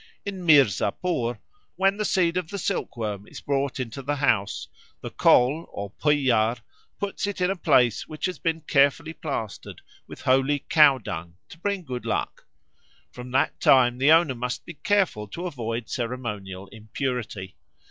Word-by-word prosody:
In 195 -3 -5
Mirzapur, 135 - +2 0.4
when 195 +1 +2
the 210 - -1
seed 175 -3 +2
of 180 -3 -2
the 200 - -5
silkworm 110 - -3
is - - -10
brought 140 -1 -1
into 125 +1 -5
the 145 +2 -2
house, 115 -8 0 0.3
the - - -6
Kol 140 +7 +3
or 100 -1 -6
Bhuiyar 125 -6 +2 0.4
puts 200 0 -3
it 205 - -4
in 180 +1 +2
a - - -1
place 125 - +2
which 155 - -5
has 185 -1 -3
been 165 -1 -1
carefully 150 +2 +2
plastered 135 -10 -6 0.3
with - - -11
holy 135 +2 +2
cowdung 110 - +3
to 160 - -13
bring 200 0 -2
good 125 -5 -6
luck. - - -3 0.6
From 125 0 -9
that 135 - +1
time 125 -2 +4
the 140 +3 +5
owner 165 -4 +5
must 125 0 -4
be - - -8
careful 185 - 0
to 170 - -6
avoid 115 -8 -4
ceremonial 105 -7 -5
impurity. 110 -2 -5
135 Hz, 155 wpm, -25 LUFS, 115-165 Hz, 0.6 s, the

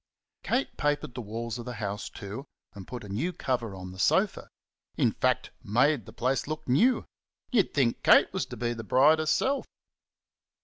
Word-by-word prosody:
Kate 260 - -1
papered 145 -4 0
the 125 - -5
walls 115 +2 -5
of 120 - -7
the 125 -1 -5
house, 105 -2 -4
too, 100 +7 -7 0.3
and 100 -3 -10
put 120 -2 -7
a - - -9
new 120 - -1
cover 120 - -2
on 90 -1 -8
the 95 - -11
sofa - - +2 0.5
in - - +3
fact, - - 0
made 120 +3 +2
the - - -9
place 130 +3 -1
look 155 +1 -5
new. 230 - +3 0.5
You'd 220 -8 +2
think 130 -5 +2
Kate - - +6
was - - -2
to - - -8
be 120 0 -1
the 115 -1 -7
bride 140 +8 +5
herself! 260 - +1
125 Hz, 180 wpm, -28 LUFS, 105-145 Hz, 0.5 s, Kate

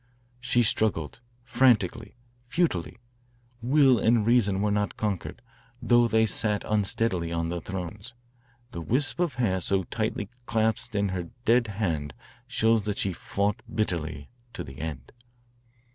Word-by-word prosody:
She 120 -1 +2
struggled 110 -2 0 0.2
frantically, 120 -4 +2 0.3
futilely. 135 - -1 0.6
Will 130 0 +4
and 110 0 +3
reason 110 -5 +3
were 105 +1 +1
not 105 0 -1
conquered, 100 -1 -3 0.4
though 120 -1 +4
they 110 -1 +3
sat 105 0 0
unsteadily 100 -4 0
on 85 0 -1
their 85 0 -3
thrones. 95 +5 -7 0.6
The 85 - -6
wisp 140 - 0
of 170 -8 0
hair 100 -7 0
so 95 +1 +1
tightly 110 +3 -3 0.2
clasped 110 0 0
in 100 -1 +1
her 90 -2 -4 0.2
dead 120 +1 +4
hand 80 -10 -2 0.3
shows 115 0 +2
that 105 -1 -2
she 95 - 0
fought 100 +3 -2
bitterly 80 -9 -2 0.2
to - - -5
the 65 0 -11
end." 75 -5 -6
105 Hz, 135 wpm, -27 LUFS, 90-115 Hz, 0.6 s, Will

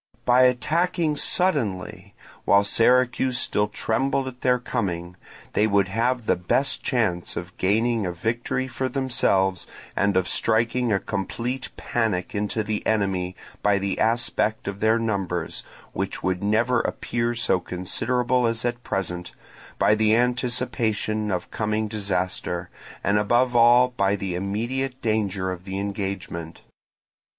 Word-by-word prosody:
By 125 +1 +6
attacking 155 +6 +1
suddenly, 110 - 0 0.3
while 100 0 +5
Syracuse 125 +4 +3
still 105 -5 +2
trembled 130 +5 -1
at 125 -1 -8
their 125 -1 +3
coming, 90 -8 -3 0.4
they 105 - +3
would 100 -2 +2
have 120 +3 0
the - - +3
best 90 +10 0
chance 110 -10 -1
of 90 +1 -6
gaining 110 +2 +1
a - - -2
victory 120 +7 -2
for 130 +1 -3
themselves 110 -8 +1 0.3
and 100 -1 +2
of 95 - +1
striking 115 +2 +1
a 100 - +2
complete 115 +7 -3
panic 110 -6 -1
into 105 +2 -1
the 105 0 -2
enemy 95 -4 0 0.3
by 105 -1 +3
the 100 0 -2
aspect 115 -2 0
of 100 0 -4
their 110 +1 +3
numbers—which 95 -7 -4
would 90 0 0
never 115 +4 +2
appear 120 0 -2
so 115 -5 +2
considerable 120 +8 0
as 115 +1 -2
at 120 0 -2
present—by 90 +1 -2
the 110 0 +3
anticipation 120 -3 0
of 90 -1 -3
coming 110 0 -1
disaster, 95 -4 -2 0.3
and 100 +2 +2
above 120 +4 +2
all 120 +2 +6
by 100 -5 +1
the 95 -2 -4
immediate 120 +8 -2
danger 100 -4 0
of 90 -1 -6
the 95 0 -5
engagement. 95 -5 -4
110 Hz, 130 wpm, -24 LUFS, 95-120 Hz, 0.4 s, By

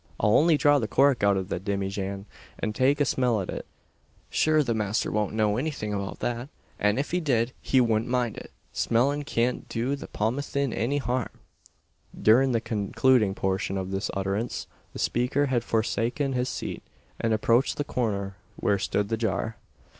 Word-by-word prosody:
I'll 105 +1 +3
only 160 0 +5
draw 145 -1 +4
the 110 - -2
cork 135 +2 +3
out 100 -1 +4
av 95 0 -3
the 90 - -2
dimmyjan, 100 0 -3 0.3
an 110 - -2
take 135 +5 +2
a 145 - +3
smell 125 -4 +1
at 95 - -3
it. - - -6 0.6
Shure 155 -1 +3
the 120 -4 0
masther 105 -1 -1
won't 105 -1 -1
know 105 -1 +2
anything 130 -7 -2
about 100 -1 -4
that; 120 +3 -2 0.3
an 105 +2 +2
if 140 - -2
he 180 - +1
did, 125 -6 +1
he 130 - +2
wudn't 115 -2 +2
mind 125 -3 0
it! - - -9 0.2
Smellin' 140 +5 +1
kyant 120 -1 -1
do 125 +4 -1
the 140 - -9
pothyeen 135 +4 -1
any 130 +6 0
harm." 125 -2 -1 0.9
During 130 +5 +5
the 115 - +2
concluding 110 0 +2
portion 95 0 -1
of 95 0 -4
this 95 +1 -2
utterance, 100 +4 -2 0.3
the - - -9
speaker 125 +4 +1
had 125 -4 0
forsaken 115 +5 0
his 125 0 0
seat, - - -5 0.4
and 115 - 0
approached 115 +4 +2
the 145 - 0
corner 100 -8 -2 0.2
where 100 -1 +1
stood 100 +1 -1
the 115 - 0
jar. 110 0 -2
115 Hz, 175 wpm, -27 LUFS, 105-130 Hz, 0.9 s, only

